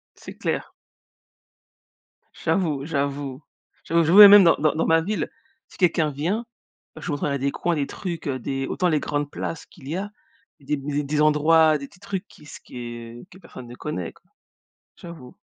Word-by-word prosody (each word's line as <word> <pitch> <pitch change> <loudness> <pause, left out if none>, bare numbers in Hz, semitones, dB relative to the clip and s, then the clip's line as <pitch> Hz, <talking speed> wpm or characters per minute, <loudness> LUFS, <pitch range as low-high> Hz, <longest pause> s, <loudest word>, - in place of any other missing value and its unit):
C'est - - -12
clair. - - -3 1.6
J'avoue, 155 -7 -1
j'avoue. 140 -2 -3 0.4
J'avoue, 170 0 +2
j'avoue 175 +6 +7
et - - +13
même 205 -1 +9
dans 165 - +5
dans 155 0 +1
dans 160 - -1
ma 165 0 +4
ville, 205 +5 -2 0.4
si - - -17
quelqu'un 165 -4 +2
vient, 170 - -2 0.5
je - - -10
lui 165 - -3
montrerais 140 -1 -1
des 140 +1 0
coins, 175 +3 -1
des 145 -2 -1
trucs, 175 -6 -6
heu, 130 -2 -2
des 135 +2 -3
autant 180 - 0
les 155 -3 +2
grandes 145 0 -2
places 165 - -5
qu'il 140 -5 -15
y 155 - -3
a 200 +2 -4 0.5
et 140 - -21
des 150 - -1
mais 145 +1 -3
des 150 +2 -1
endroits, 155 +1 +4
des 140 -1 -8
petits 180 - -22
trucs 200 -1 -5
qui 150 - -18
se - - -10
que 120 -1 -9
que 185 - -15
personne 130 -9 -12
ne 120 - -10
connaît, 90 - -5
quoi. - - -28 0.7
J'avoue. 165 -8 -11
150 Hz, 190 wpm, -23 LUFS, 140-170 Hz, 1.6 s, et